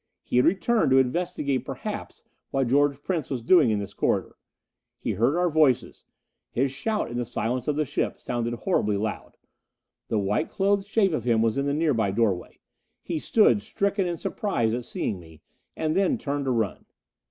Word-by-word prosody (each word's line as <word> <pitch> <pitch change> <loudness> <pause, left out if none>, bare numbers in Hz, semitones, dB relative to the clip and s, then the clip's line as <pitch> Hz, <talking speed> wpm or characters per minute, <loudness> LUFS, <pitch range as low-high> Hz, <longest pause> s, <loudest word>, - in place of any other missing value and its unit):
He - - -1
had 125 - +5
returned, 200 - +2
to 130 - +5
investigate 140 -1 0
perhaps - - -6 0.3
what 135 -3 0
George 145 +1 +2
Prince 170 -7 -2
was 125 -4 -3
doing 150 -1 +5
in 110 - +1
this 100 -1 -5
corridor. - - -1 0.6
He - - -3
heard 120 - +1
our 180 0 +2
voices; 140 -6 +2 0.4
his 135 +2 0
shout 210 - -2
in 120 - -4
the 120 - 0
silence 120 +1 -2
of 150 - +1
the 155 0 0
ship - - -2
sounded 120 0 -2
horribly 105 - 0
loud. 105 +1 -4 0.7
The 110 - 0
white 100 +10 0
clothed 200 0 +1
shape 200 -4 +2
of 125 -7 -2
him 115 -2 +3
was 115 -1 +1
in 140 +1 0
the 140 - +1
nearby 145 -10 +1
doorway. 100 -3 -1 0.5
He 165 -3 -3
stood 210 +3 +4
stricken 200 -2 -1
in 170 -1 -2
surprise 120 - -1
at 120 0 -3
seeing 95 - -3
me. 80 -2 -16 0.3
And 155 0 0
then 195 +7 +2
turned 145 -7 -3
to 130 - +1
run. 110 -5 -2
135 Hz, 185 wpm, -26 LUFS, 115-175 Hz, 0.7 s, had